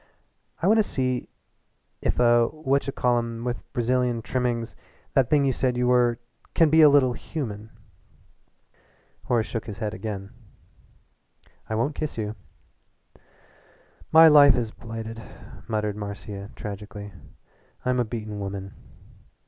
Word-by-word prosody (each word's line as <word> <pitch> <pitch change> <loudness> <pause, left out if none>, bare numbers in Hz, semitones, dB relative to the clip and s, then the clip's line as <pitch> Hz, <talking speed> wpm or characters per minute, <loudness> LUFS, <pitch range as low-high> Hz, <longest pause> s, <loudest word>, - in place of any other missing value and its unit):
I - - +3
want 220 +3 +5
to - - +5
see 130 -8 -2 0.7
if - - 0
a 120 -1 +4
what 140 -3 0
ch - - -5
call 120 -1 +2
em 115 0 -5
with 120 0 -5
Brazilian 125 -1 0
trimmings 120 -2 -2 0.4
that 130 -3 +3
thing 145 -2 +3
you 135 - +2
said 125 0 0
you 125 - +1
were 125 -1 +3 0.4
can 160 -3 +4
be 160 +1 +6
a 150 - +9
little 135 -3 +4
human." 110 -7 -6 1.6
Horace 120 -3 +1
shook 115 - -5
his 105 -2 -6
head 105 -1 -3
again. 100 -2 -6 1.4
"I 110 - -1
won't 120 +7 0
kiss 155 -3 -4
you." 105 -1 -3 1.8
"My 160 +1 +9
life 145 -2 +8
is 115 -3 -2
blighted," 115 0 -7 0.5
muttered 105 -2 -1
Marcia 100 -1 -7
tragically. 105 0 -8 0.7
"I'm 125 0 +1
a - - +3
beaten 110 -2 -6
woman. 100 0 -6
120 Hz, 135 wpm, -25 LUFS, 110-130 Hz, 1.8 s, a